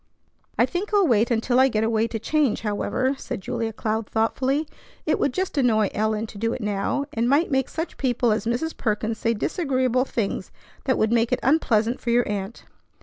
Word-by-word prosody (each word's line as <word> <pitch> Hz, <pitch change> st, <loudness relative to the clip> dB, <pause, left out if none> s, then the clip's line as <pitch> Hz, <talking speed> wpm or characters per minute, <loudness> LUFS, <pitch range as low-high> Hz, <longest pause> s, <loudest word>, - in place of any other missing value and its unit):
"I -, -, +5 dB
think 370 Hz, +4 st, -4 dB
I'll 400 Hz, -2 st, +5 dB
wait 235 Hz, -5 st, +3 dB
until 245 Hz, +2 st, +2 dB
I 265 Hz, -, +6 dB
get 220 Hz, -4 st, 0 dB
away 225 Hz, 0 st, +1 dB
to 230 Hz, -, -4 dB
change, 280 Hz, +1 st, +1 dB
however," 225 Hz, +5 st, 0 dB
said -, -, -5 dB
Julia 225 Hz, +3 st, -3 dB
Cloud 220 Hz, 0 st, -2 dB
thoughtfully. 265 Hz, +7 st, 0 dB, 0.4 s
"It -, -, +1 dB
would 280 Hz, -, +2 dB
just 370 Hz, 0 st, -2 dB
annoy 220 Hz, -5 st, +3 dB
Ellen 215 Hz, +1 st, 0 dB
to 210 Hz, -2 st, -10 dB
do 230 Hz, +2 st, 0 dB
it -, -, -5 dB
now, 210 Hz, +7 st, -1 dB
and 230 Hz, +1 st, 0 dB
might 295 Hz, +5 st, +3 dB
make 265 Hz, -1 st, +1 dB
such 325 Hz, +2 st, -5 dB
people 245 Hz, -3 st, +1 dB
as 220 Hz, +1 st, -1 dB
Mrs. 255 Hz, +8 st, -1 dB
Perkins 220 Hz, 0 st, -1 dB
say 230 Hz, 0 st, +1 dB
disagreeable 255 Hz, -, 0 dB
things 205 Hz, -7 st, -3 dB, 0.4 s
that 260 Hz, -2 st, +2 dB
would 220 Hz, 0 st, +2 dB
make 235 Hz, 0 st, +2 dB
it -, -, +1 dB
unpleasant 240 Hz, -5 st, +2 dB
for 240 Hz, -, -3 dB
your 240 Hz, +1 st, +3 dB
aunt." 205 Hz, +1 st, -4 dB
235 Hz, 200 wpm, -24 LUFS, 220-265 Hz, 0.4 s, I